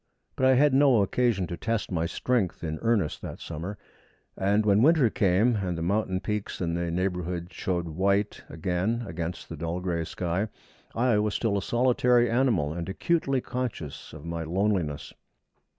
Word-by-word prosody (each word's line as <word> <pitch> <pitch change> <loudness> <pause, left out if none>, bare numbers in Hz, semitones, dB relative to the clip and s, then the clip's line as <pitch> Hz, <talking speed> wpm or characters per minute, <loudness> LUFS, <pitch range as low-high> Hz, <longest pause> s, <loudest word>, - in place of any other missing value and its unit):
But 130 - +3
I 130 - +6
had 145 +2 +4
no 135 -6 +5
occasion 115 -3 +1
to 85 - -5
test 115 +5 -2
my 85 -2 0
strength 100 -5 -1
in 80 -1 -3
earnest 115 -9 +1
that - - -7
summer, 85 +5 -6 0.6
and 100 +2 +2
when 105 0 +4
winter 145 -4 +5
came, 105 +4 +3
and 90 -4 -2
the 80 - -3
mountain 95 0 0
peaks 105 -1 -3
in 85 -2 -1
the 85 0 -1
neighbourhood 90 0 -2
showed 90 -3 -2
white 100 +5 0
again 90 +8 -1
against 85 0 -5
the 80 - -7
dull 85 +3 -3
gray 85 -2 -1
sky, 90 +5 -2 0.5
I 120 -2 +3
was 105 0 0
still 110 -4 0
a 100 - 0
solitary 120 +3 +3
animal, 115 - +2
and 85 +1 -5
acutely 135 - 0
conscious 120 - -5
of 75 0 -10
my 85 -1 -3
loneliness. 90 -3 -1
95 Hz, 165 wpm, -27 LUFS, 85-115 Hz, 0.6 s, I